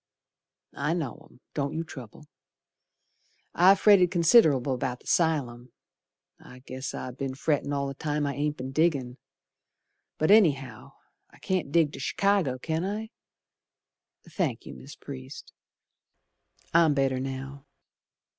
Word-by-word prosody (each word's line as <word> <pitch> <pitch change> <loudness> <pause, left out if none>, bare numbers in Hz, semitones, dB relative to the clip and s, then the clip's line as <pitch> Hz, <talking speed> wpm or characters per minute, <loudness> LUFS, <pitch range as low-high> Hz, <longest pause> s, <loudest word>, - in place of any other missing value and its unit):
I 165 +3 0
know 145 -10 -5
'em, - - -23
don't 140 0 -2
you 165 - -2
trouble. 130 -2 -11 1.3
I've 190 +3 +5
fretted 195 -4 +6
considerable 160 - +4
about 125 0 -3
the - - -23
'sylum, 130 -8 0 0.7
I 125 0 -15
guess 130 +1 -6
I 130 - -5
be'n 130 +1 -5
frettin' 145 0 -1
all 140 -1 -1
the 135 - -4
time 150 +1 -2
I 140 - -2
ain't 150 +2 -2
be'n 130 +1 -6
diggin'. 135 -5 0 1.0
But 155 +5 +2
anyhow 145 -12 +2 0.4
I - - -20
can't 185 -7 -2
dig 155 -2 +2
to - - -8
Chicago, 195 -10 +1
can 160 +5 -3
I? 215 +4 -4 1.2
Thank 150 - -3
you, - - -9
Mis' 140 - -12
Priest, 130 0 -10 1.2
I'm 165 -3 +4
better 135 -1 +1
now. 135 +2 -6
145 Hz, 130 wpm, -27 LUFS, 130-165 Hz, 1.3 s, fretted